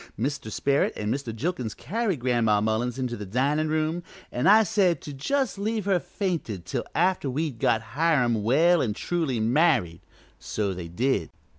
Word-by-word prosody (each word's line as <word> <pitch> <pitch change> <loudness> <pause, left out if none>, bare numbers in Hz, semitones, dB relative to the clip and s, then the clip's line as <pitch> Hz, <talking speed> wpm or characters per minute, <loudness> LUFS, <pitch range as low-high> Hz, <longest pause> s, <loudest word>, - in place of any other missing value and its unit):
Mr. 135 -2 -2
Sperrit 140 +5 +1
an' 105 +1 -2
Mr. 135 -3 -3
Jilkins 125 - -3
carried 195 - -2
Gran'ma 120 -4 +2
Mullins 110 +3 -1
into 125 -2 -2
the 105 -2 -7
dinin' 145 +8 +1
room, 155 +2 0 0.3
an' 125 +8 0
I 215 +3 +7
said 195 -5 +2
to 145 - -8
just 260 - -1
leave 215 0 -1
her 195 -3 +2
fainted 160 - -4
till - - -3
after 180 -4 +1
we'd 140 -2 -2
got 110 0 +2
Hiram 130 -7 +2
well 160 +10 +4
an' 110 -5 0
truly 160 -7 -1
married; 115 - +2 0.4
so 100 -3 -2
they 90 -2 -6
did. 120 +11 0
140 Hz, 165 wpm, -26 LUFS, 115-175 Hz, 0.4 s, I